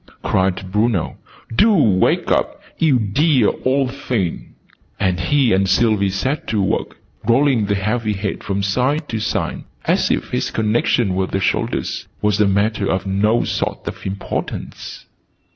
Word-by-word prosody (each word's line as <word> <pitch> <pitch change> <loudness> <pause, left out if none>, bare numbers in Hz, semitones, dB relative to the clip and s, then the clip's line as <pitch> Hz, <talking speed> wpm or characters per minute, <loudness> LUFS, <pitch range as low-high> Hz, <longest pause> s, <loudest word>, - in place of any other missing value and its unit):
cried 95 0 0
Bruno. 105 -3 0 0.4
"Do 220 - +5
wake 105 - +2
up, - - 0 0.2
you 150 -5 +4
dear 125 +3 +2
old 130 0 +1
thing!" 120 - -3 0.4
And 90 -2 +1
he 130 +4 +2
and 95 0 +2
Sylvie 105 -3 +3
set 115 +10 -2
to 110 - 0
work, 95 - -1 0.3
rolling 120 -3 +3
the 100 - +1
heavy 105 +2 -1
head 100 0 -4
from 100 0 -2
side 130 +9 0
to 115 - -2
side, 110 - -2 0.2
as - - +2
if - - -2
its - - 0
connection 110 -1 +1
with 95 0 -1
the 95 - -1
shoulders 95 - -1
was 105 0 +1
a 105 - +4
matter 100 +1 +1
of 95 +1 -1
no 105 +4 +2
sort - - -3
of - - -6
importance. 95 +1 -5
105 Hz, 150 wpm, -19 LUFS, 95-125 Hz, 0.4 s, Do